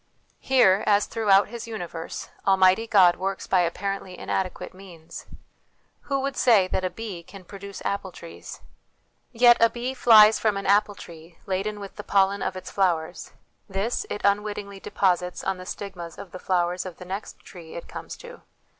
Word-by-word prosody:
Here, 215 -7 +4
as 205 0 +4
throughout 205 -4 +3
his 235 0 -7
universe, 175 -7 -6 0.2
Almighty 190 +3 +4
God 185 -5 +5
works 195 +1 -3
by 185 - +2
apparently 185 +1 -2
inadequate 185 -1 -3
means. 180 -4 -12 0.8
Who 275 -1 0
would 275 0 -3
say 215 -7 +4
that 185 - -2
a 185 - 0
bee 205 -4 -7
can 185 +2 -14
produce 200 +1 -9
apple 200 -1 -2
trees? 170 -1 -11 0.7
Yet 240 0 +6
a 230 - +5
bee 245 +3 -4
flies 220 -4 +7
from 215 -3 +1
an 195 - -5
apple 205 +1 +3
tree 165 -2 -13
laden 200 +2 -2
with 200 -1 -10
the 210 - -6
pollen 195 0 +2
of 190 - -2
its 185 0 -8
flowers: 175 -3 -1 0.4
this 195 +5 -2
it 205 - -4
unwittingly 200 -1 -1
deposits 180 -2 -1
on 190 -1 -2
the 185 - -10
stigmas 175 -5 -7
of 185 - -10
the 185 - -8
flowers 180 -1 0
of 185 -3 -9
the 180 - -10
next 195 +3 -6
tree 170 -3 -12
it 170 - -8
comes - - -8
to. 485 0 -12
195 Hz, 170 wpm, -25 LUFS, 180-210 Hz, 0.8 s, flies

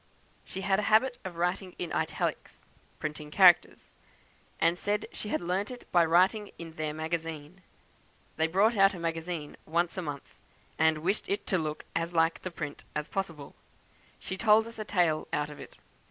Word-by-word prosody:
She 190 - -7
had 195 +1 +2
a 210 - 0
habit 245 +3 +4
of 185 -2 -6
writing 180 +2 -1
in 175 - -4
italics - - -2 0.3
(printing 150 -1 -5
characters), 180 +1 +5 0.7
and 165 +1 +3
said 205 +3 -1
she 210 - -6
had - - 0
learnt 180 +4 -1
it 250 -1 -10
by 175 -1 +5
writing 185 +6 +3
in 165 -1 -8
their 155 -1 -3
magazine. 160 +1 -4 0.7
They 160 +1 +2
brought 200 +7 +3
out 195 -1 +5
a - - -7
'magazine' 165 -2 -4
once 170 +3 0
a - - -1
month, 145 -4 -7 0.4
and 160 -1 +3
wished 195 +5 0
it 200 - -1
to 190 - +1
look 155 -1 -4
as 165 +1 -1
like 165 0 +2
print 150 -3 -5
as 150 +1 -3
possible. 165 -7 -4 0.6
She 190 - -6
told 220 +1 +5
us 230 -1 -10
a 215 - -3
tale 175 -6 +1
out 150 0 -1
of 145 - -11
it. - - -11
175 Hz, 175 wpm, -29 LUFS, 160-195 Hz, 0.7 s, characters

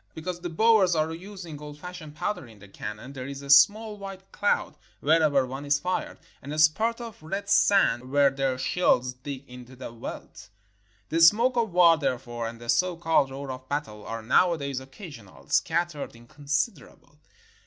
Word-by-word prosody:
Because 175 +2 -5
the 175 0 -5
Boers 195 0 +4
are 155 +1 0
using 175 -4 -9
old 150 0 -9
fashioned 170 -3 -9
powder 205 - -3
in 110 -2 -16
their 100 0 -15
cannon 105 +6 -8
there 130 -1 -6
is 140 0 -7
a 140 - -2
small 210 +8 +5
white 195 -1 -9
cloud 205 -6 0 0.2
wherever 150 -3 +3
one 135 +2 -7
is 145 0 +2
fired, 180 +4 -3 0.2
and 140 - -8
a 155 - -4
spurt 220 +10 +3
of 230 -6 -9
red 195 +6 -5
sand 195 -11 +3
where 140 0 +4
their 135 -1 -1
shells 130 -3 +1
dig 135 +2 -8
into 125 +1 -12
the 125 -2 -8
veldt. 115 -2 -9 0.6
The 165 - 0
smoke 230 +9 +6
of 230 -4 0
war, 170 -2 +6
therefore, 120 -4 -3
and 115 0 -8
the 120 - -11
so 180 +8 +2
called 165 -5 +2
roar 135 0 -6
of 130 0 -9
battle 140 -8 -4
are 115 0 -5
nowadays 140 0 +2
occasional, 130 - -12
scattered, 170 -5 0
inconsiderable. 145 - -4
150 Hz, 175 wpm, -26 LUFS, 130-180 Hz, 0.6 s, smoke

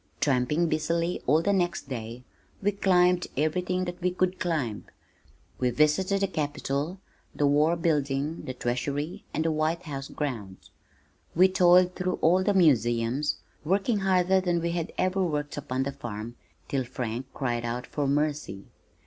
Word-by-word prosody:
Tramping 145 +5 +2
busily 165 +2 -1
all 155 +5 +4
the 200 - +2
next 175 -4 0
day, 120 -1 -6 0.4
we 205 +1 +1
climbed 180 -2 +3
everything 180 +5 0
that 175 0 -6 0.2
could 185 - +3
be - - -21
climbed. 140 - -2 0.7
We 125 - +2
visited 155 +9 +2
the - - +3
Capitol, 145 +1 -2 0.4
the 145 - +1
war 150 +4 +3
building, 150 -2 -1
the 130 - -5
Treasury 140 +6 -3
and 160 - -1
the 165 - +2
White 155 +3 0
House 140 -3 -5
grounds. 110 -10 -5 0.6
We 185 +3 +6
toiled 180 -1 +5
through 185 0 -1
all 180 +3 +5
the 205 +1 +1
museums, 125 - +2 0.3
working 195 +6 +1
harder 190 -1 +3
than 175 -2 +1
we 170 0 -1
had 170 -1 -3
ever 185 +1 +1
worked 150 -4 -2
upon 130 -2 -2
the 140 - -2
farm, 115 -2 -7 0.3
till 135 -2 -1
Frank 125 0 -4
cried 120 -3 -1
out 120 +1 -3
for 145 -2 -2
mercy. 145 -7 -1
155 Hz, 155 wpm, -27 LUFS, 135-180 Hz, 0.7 s, We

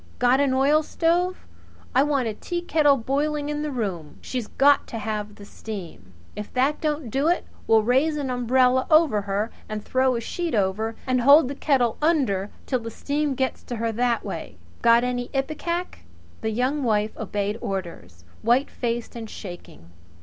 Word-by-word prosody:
Got 250 +2 +3
an 285 -1 +3
oilstove? 330 +6 +2 0.6
I 260 - +5
want 280 -4 +1
a 220 - -2
teakettle 315 +1 +1
boiling 295 +2 0
in 295 0 -2
the 300 - -2
room. 190 - -4
She's 250 -4 -4
got 285 +1 +3
to 230 - -6
have 210 -1 -4
the 205 - -12
steam. 180 - -9 0.2
If 210 0 -7
that 270 +4 +1
don't 300 -6 -2
do 275 +5 +1
it 350 - +1 0.2
we'll 220 -1 +5
raise 270 +7 +2
an 275 -3 -2
umbrella 250 +1 +2
over 310 -10 +4
her 200 +3 -2 0.2
and 215 -1 -4
throw 260 0 +2
a - - -1
sheet 335 +6 -3
over, 215 +3 0
and 255 -1 +1
hold 280 +2 +7
the - - -3
kettle 260 -5 +1
under 255 - +1 0.2
till 255 - 0
the 230 -1 -6
steam 290 +4 -2
gets 260 0 -1
to 240 - -6
her 230 0 -1
that 240 +1 0
way. - - -6 0.2
Got 235 0 +5
any 245 -1 -2
ipecac?" 340 +6 -2 0.4
The 220 - -1
Young 255 +6 0
Wife 215 -2 +1
obeyed 205 0 -3
orders, 130 - -6 0.2
whitefaced 240 -1 0
and 225 -2 -7
shaking. 175 - -10
250 Hz, 170 wpm, -24 LUFS, 215-285 Hz, 0.6 s, hold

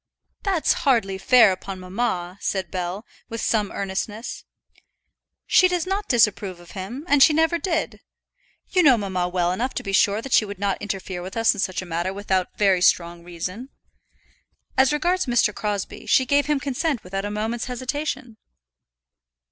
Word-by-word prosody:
"That's 380 -6 +2
hardly 225 -10 +1
fair 230 -1 +6
upon 190 +1 -6
mamma," 185 -1 -3
said 190 -1 -2
Bell, 185 +4 -4 0.2
with 230 0 -5
some 215 -3 0
earnestness. 200 +3 -4 1.0
"She 370 - +5
does 360 -2 -1
not 390 +2 -3
disapprove 210 -6 +2
of 175 0 -15
him, 210 - -7
and 290 -3 +4
she 305 - +7
never 320 +2 +2
did. 330 -4 -2 0.7
You 365 - +4
know 275 -7 +6
mamma 185 -4 -2
well 175 -1 0
enough 240 +8 -2
to - - -3
be 195 - -4
sure 205 +1 +3
that 270 - -4
she - - +6
would 205 -1 -7
not 200 -1 -1
interfere 190 -3 -4
with 185 +5 -7
us 225 0 +4
in 205 - -8
such 185 -1 -1
a - - -9
matter 175 +2 -2
without 190 -2 -1
very 195 -3 +3
strong 170 -1 +2
reason. 180 +8 -6 1.1
As 265 +1 +4
regards 350 +3 0
Mr. 235 -3 +2
Crosbie, 205 -2 -4
she 260 - +4
gave 285 +2 +2
her 300 -1 +2
consent 275 0 -2
without 195 +2 -4
a - - -2
moment's 220 +3 -3
hesitation." 255 -1 -4
210 Hz, 170 wpm, -23 LUFS, 190-265 Hz, 1.1 s, she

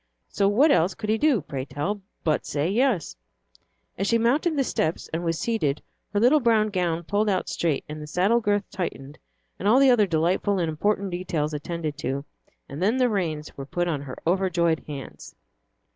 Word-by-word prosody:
So 200 - +1
what 265 +10 +4
else 180 -7 +3
could 215 -2 -2
he 220 - +1
do, 290 - +3
pray 135 -2 -5
tell, 175 +9 -3 0.2
but 155 -2 +1
say 145 +2 -1
"Yes"? 225 - +1 0.8
And 195 - 0
she 230 - +3
mounted 280 +8 +2
the 275 - +3
steps, 160 -9 -1
and 165 +2 -2
was 165 -1 0
seated, 155 -12 -1 0.3
her 205 - +1
little 255 +7 +5
brown 225 -4 +3
gown 175 -4 -1
pulled 205 +5 0
out 185 -2 0
straight, 160 -4 -1
and 155 0 -7
the 150 - -7
saddle 195 +9 +2
girth 205 -1 0
tightened, 150 -6 -5 0.4
and 200 - -1
all 225 +5 +6
the 275 -1 +6
other 215 -5 +4
delightful 180 +4 +1
and 170 -3 0
important 200 +4 0
details 165 -4 -2
attended 155 0 -4
to, 140 +2 -3 0.4
and 140 +5 -7
then 215 +7 +2
the 250 -1 +3
reins 160 -8 -2
were 135 - -7
put 175 +4 -1
in 150 -5 -1
her 135 -3 -8
overjoyed 170 -2 +1
hands. 140 -3 -8
185 Hz, 190 wpm, -25 LUFS, 155-215 Hz, 0.8 s, all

